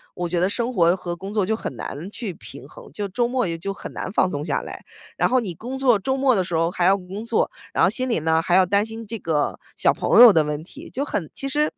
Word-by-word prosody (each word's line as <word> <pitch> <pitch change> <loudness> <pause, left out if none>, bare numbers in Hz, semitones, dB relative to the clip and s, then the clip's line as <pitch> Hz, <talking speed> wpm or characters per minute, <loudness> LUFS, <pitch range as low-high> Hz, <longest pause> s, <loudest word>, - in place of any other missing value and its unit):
我 175 -1 -2
觉 175 +1 -2
得 185 +2 +2
生 240 +4 -1
活 170 -3 +4
和 175 -2 -5
工 195 +4 -8
作 205 -4 +1
就 220 +2 0
很 - - -6
难 160 +8 -6
去 210 -6 -5
平 - - -11
衡， - - -14
就 205 -1 -3
周 240 +6 0
末 250 -3 0
也 165 -1 -3
就 195 +4 -4
很 - - -9
难 185 - -5
放 190 - +2
松 145 -2 -4
下 - - -1
来， - - -9 0.3
然 - - +1
后 255 0 +3
你 195 -7 -4
工 255 +9 -7
作 250 -5 +4
周 265 +7 -2
末 265 -2 +3
的 190 - +1
时 175 -1 -4
候 165 +1 +2
还 175 0 -2
要 195 +2 +5
工 195 +3 -8
作， 230 -1 +1 0.2
然 - - 0
后 190 - +5
心 255 +4 0
里 230 - +1
呢， 160 +1 +2
还 175 +1 -1
要 190 -1 +6
担 200 +3 +2
心 225 0 -7
这 225 +2 -5
个 155 -4 -1 0.2
小 - - +3
朋 - - +4
友 235 -5 +10
的 160 - +4
问 150 0 -3
题， 290 - -12
就 280 +3 -3
很 165 - -3
其 275 - -3
实 300 +2 +1
200 Hz, 305 characters per minute, -22 LUFS, 175-240 Hz, 0.3 s, 友